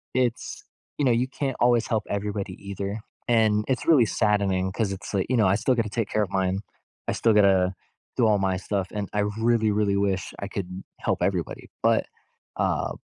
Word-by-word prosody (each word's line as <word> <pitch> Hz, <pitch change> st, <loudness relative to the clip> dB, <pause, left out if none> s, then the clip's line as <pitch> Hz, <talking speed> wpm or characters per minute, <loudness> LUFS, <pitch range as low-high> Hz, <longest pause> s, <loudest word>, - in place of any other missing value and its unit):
it's, 125 Hz, -1 st, -1 dB, 0.4 s
you 145 Hz, -, +2 dB
know, 125 Hz, -, +4 dB
you 120 Hz, +2 st, +2 dB
can't 135 Hz, -1 st, -3 dB
always 120 Hz, -1 st, +3 dB
help 110 Hz, -3 st, 0 dB
everybody, 100 Hz, -1 st, -3 dB, 0.2 s
either. 100 Hz, +2 st, -4 dB, 0.3 s
And 110 Hz, -3 st, +3 dB
it's 130 Hz, -2 st, -1 dB
really 140 Hz, -8 st, +6 dB
saddening 100 Hz, -4 st, +1 dB
'cause 105 Hz, -1 st, -1 dB
it's 95 Hz, -, -6 dB
like, 95 Hz, -2 st, +1 dB
you 130 Hz, -, +2 dB
know, 105 Hz, -4 st, +4 dB
I 95 Hz, -, +3 dB
still 130 Hz, +4 st, +2 dB
gotta 115 Hz, -3 st, 0 dB
take 110 Hz, 0 st, -1 dB
care 110 Hz, -, +1 dB
of 100 Hz, -, -1 dB
mine. 95 Hz, 0 st, 0 dB, 0.5 s
I -, -, +1 dB
still 115 Hz, -2 st, +3 dB
gotta 95 Hz, -3 st, +4 dB, 0.4 s
do 120 Hz, -3 st, +3 dB
all 105 Hz, -1 st, +4 dB
my 95 Hz, -1 st, 0 dB
stuff, 95 Hz, 0 st, -2 dB
and 100 Hz, -2 st, -3 dB
I 105 Hz, -, +1 dB, 0.2 s
really, 115 Hz, -2 st, +3 dB
really 100 Hz, -1 st, +1 dB
wish 100 Hz, -1 st, -1 dB
I 100 Hz, -, -4 dB
could 95 Hz, -1 st, -6 dB, 0.2 s
help -, -, -1 dB
everybody, -, -, -2 dB
but, -, -, +3 dB, 0.5 s
uh, -, -, 0 dB
105 Hz, 195 wpm, -25 LUFS, 95-115 Hz, 0.5 s, really